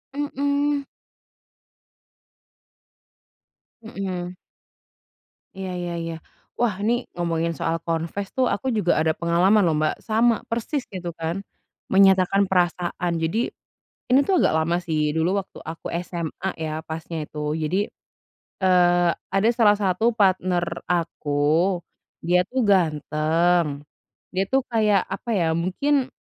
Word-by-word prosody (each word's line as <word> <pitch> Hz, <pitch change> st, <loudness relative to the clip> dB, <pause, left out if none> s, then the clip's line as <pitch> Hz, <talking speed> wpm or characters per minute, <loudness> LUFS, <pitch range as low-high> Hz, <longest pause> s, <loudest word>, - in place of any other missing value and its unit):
Mhm. 285 Hz, 0 st, 0 dB, 3.0 s
Mhm. 185 Hz, -5 st, -5 dB, 1.2 s
Iya 190 Hz, -1 st, -4 dB
iya 175 Hz, -1 st, -3 dB
iya. 165 Hz, 0 st, -4 dB, 0.5 s
Wah, 235 Hz, -5 st, +2 dB
ini 220 Hz, +3 st, +2 dB, 0.2 s
ngomongin 170 Hz, -1 st, -1 dB
soal 165 Hz, 0 st, 0 dB
confess 165 Hz, +4 st, -2 dB
tuh 260 Hz, -, +4 dB
aku -, -, -3 dB
juga 180 Hz, -4 st, +2 dB
ada 160 Hz, 0 st, +2 dB
pengalaman 175 Hz, +5 st, +3 dB
loh, 160 Hz, -2 st, +2 dB
Mbak, 155 Hz, 0 st, +1 dB
sama 230 Hz, +1 st, +3 dB
persis 235 Hz, +5 st, -2 dB
gitu 185 Hz, -3 st, -5 dB
kan 165 Hz, +1 st, -2 dB, 0.6 s
menyatakan 190 Hz, 0 st, +5 dB
perasaan. 175 Hz, -1 st, 0 dB
Jadi 165 Hz, +7 st, 0 dB, 0.7 s
ini 255 Hz, +2 st, +5 dB
tuh 375 Hz, +1 st, +2 dB
agak -, -, +3 dB
lama 160 Hz, +2 st, +1 dB
sih, 155 Hz, -4 st, 0 dB
dulu 170 Hz, +5 st, +1 dB
waktu 195 Hz, -, -13 dB
aku 165 Hz, +1 st, -8 dB, 0.2 s
SMA 170 Hz, +2 st, -4 dB
ya 155 Hz, -1 st, -3 dB
pasnya 160 Hz, 0 st, -5 dB
itu. 150 Hz, 0 st, -8 dB, 0.2 s
Jadi, 155 Hz, +4 st, 0 dB, 0.9 s
eee, 175 Hz, -1 st, +4 dB, 0.2 s
ada 195 Hz, +3 st, +3 dB
salah 225 Hz, -3 st, +4 dB
satu 205 Hz, +3 st, +1 dB
partner 185 Hz, -3 st, +2 dB, 0.2 s
aku, 165 Hz, +1 st, +1 dB, 0.4 s
dia 175 Hz, +2 st, +3 dB
tuh 260 Hz, -, -2 dB
ganteng, 160 Hz, -3 st, +2 dB, 0.5 s
dia 185 Hz, +1 st, 0 dB
tuh 265 Hz, +5 st, +2 dB
kayak, 210 Hz, -4 st, +3 dB
apa 195 Hz, +5 st, -6 dB
ya, 170 Hz, -4 st, +2 dB
mungkin 250 Hz, -, +1 dB
180 Hz, 120 wpm, -23 LUFS, 165-205 Hz, 3.0 s, menyatakan